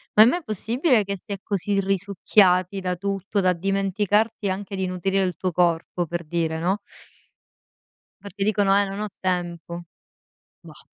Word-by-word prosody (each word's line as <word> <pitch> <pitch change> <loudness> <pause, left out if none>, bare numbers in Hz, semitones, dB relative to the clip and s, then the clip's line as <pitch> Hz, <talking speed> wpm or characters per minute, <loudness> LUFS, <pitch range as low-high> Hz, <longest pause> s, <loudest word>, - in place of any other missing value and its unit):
ma 215 - +10
è - - +6
mai 340 +9 +1
possibile 230 - +1
che 200 0 -3
si 200 - -13
è 200 - -2
così 200 0 -1
risucchiati 195 -1 +2
da 180 -1 -1
tutto 200 +1 -2
da 185 -1 +3
dimenticarti 195 +3 0
anche 195 +1 -4
di 190 -1 -1
nutrire 190 +2 0
il 180 -1 -1
tuo 185 - -1
corpo, 175 0 +1
per 170 +1 -4
dire, 160 0 -1
no? 185 +5 0 1.4
Perché 200 0 -5
dicono: 200 -1 +3
"Eh 205 - +3
non 195 +1 -5
ho 215 - -2
tempo." 175 -2 -3 0.8
Bah! - - -15
195 Hz, 160 wpm, -24 LUFS, 180-205 Hz, 1.4 s, ma